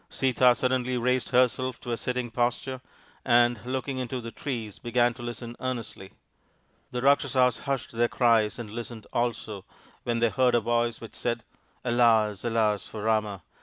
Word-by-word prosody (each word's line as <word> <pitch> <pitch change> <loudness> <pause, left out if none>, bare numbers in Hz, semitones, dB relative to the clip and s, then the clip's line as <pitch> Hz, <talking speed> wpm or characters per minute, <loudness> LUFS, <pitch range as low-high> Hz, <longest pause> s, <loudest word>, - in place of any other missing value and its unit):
Sita 125 -1 +3
suddenly 130 0 0
raised 125 0 +1
herself 130 +1 +2
to 120 - -5
a - - +1
sitting 125 +1 -3
posture 125 +2 -1 0.4
and, 120 -3 +3
looking 130 +1 -2
into 125 0 -3
the 115 -1 -7
trees, 115 -8 -5
began 120 0 +2
to 120 - -12
listen 120 0 -6
earnestly. 120 -6 -5 0.8
The 125 0 -4
Rakshasas 130 -2 +3
hushed 135 -3 -2
their 120 +1 +2
cries 115 -4 +2
and 115 -4 -7
listened 115 -1 -7
also, 115 -4 -2 0.4
when 120 -1 -1
they 115 0 +3
heard 125 0 +3
a - - +5
voice 120 0 0
which 115 - -9
said, 120 -2 -2 0.2
" - - -36
Alas, 115 -4 +3
alas, 110 -3 +1
for 105 -2 -7
Rama! 105 -4 0
120 Hz, 165 wpm, -27 LUFS, 115-125 Hz, 0.8 s, a